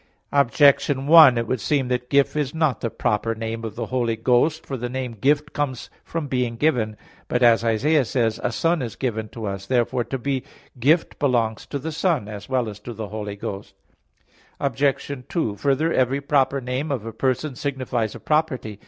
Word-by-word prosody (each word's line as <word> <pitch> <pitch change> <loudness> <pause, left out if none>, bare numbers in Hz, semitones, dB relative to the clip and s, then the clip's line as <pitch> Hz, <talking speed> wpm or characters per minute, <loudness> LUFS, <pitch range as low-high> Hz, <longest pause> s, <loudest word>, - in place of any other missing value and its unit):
Objection 140 0 +3
1: 155 -5 +8
It 115 - 0
would 125 +1 -2
seem 140 -4 +1
that 125 0 -2
Gift 140 0 +3
is 150 -1 -1
not 155 -5 +1
the 115 - -1
proper 110 +1 -1
name 115 0 -4
of 110 -2 -5
the - - -3
Holy 120 -3 -1
Ghost. 125 +8 +1
For 135 - -4
the 125 -1 -4
name 130 -1 -3
Gift 145 +7 +1
comes 135 -4 -3
from 165 -2 -4
being 125 -3 -1
given. 115 -6 0 0.3
But, 125 0 0
as 115 -1 +5
Isaiah 135 +7 +2
says 115 -2 0
(9:16): - - -6
"A - - -3
Son 165 +5 +1
is 120 -4 -5
given 110 -4 -3
to 115 -1 -7
us." 100 -1 -5
Therefore 120 -1 +1
to 135 +4 -3
be 135 +1 -2 0.4
Gift 155 +8 +2
belongs 120 -6 0
to 145 - -3
the 160 +4 -5
Son, 160 - 0
as 105 0 -8
well 130 -3 0
as 105 -1 -7
to 120 - -8
the 110 -1 -6
Holy 105 -1 -5
Ghost. 100 -1 -7 0.8
Obj. 140 0 0 0.2
2: 135 - -1
Further, 145 +6 +1
every 130 +2 +2
proper 140 -1 +1
name 130 +4 -3
of 120 -6 -3
a 115 - -6
person 130 +4 -1
signifies 125 -5 -2
a - - -8
property. 135 -9 -1
125 Hz, 195 wpm, -23 LUFS, 115-140 Hz, 0.8 s, 1